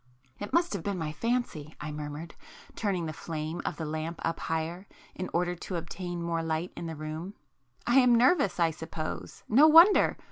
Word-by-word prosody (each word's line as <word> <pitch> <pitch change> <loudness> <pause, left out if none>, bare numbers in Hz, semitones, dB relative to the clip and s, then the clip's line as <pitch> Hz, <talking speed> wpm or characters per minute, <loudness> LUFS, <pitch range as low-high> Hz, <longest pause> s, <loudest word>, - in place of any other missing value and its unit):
"It 205 - -6
must 340 -4 +2
have 200 - -3
been 200 +2 -2
my 160 -3 -3
fancy;" 170 -6 -2
I 150 +1 -5
murmured, 150 +2 -6 0.4
turning 190 -6 -1
the 155 - -4
flame 160 +1 -5
of - - -3
the 160 - -4
lamp 155 +2 -4
up 165 - -1
higher 165 +4 -3 0.3
in 185 - -5
order 175 +1 0
to 180 +1 -6
obtain 175 +1 -5
more 170 -1 -1
light 165 +2 -2
in 170 - -5
the 160 - -5
room—"I 155 - -4
am 250 -2 +5
nervous 245 - +3
I 165 -1 +3
suppose,—no 160 - +1
wonder! 335 +6 +7
170 Hz, 175 wpm, -29 LUFS, 155-200 Hz, 0.4 s, wonder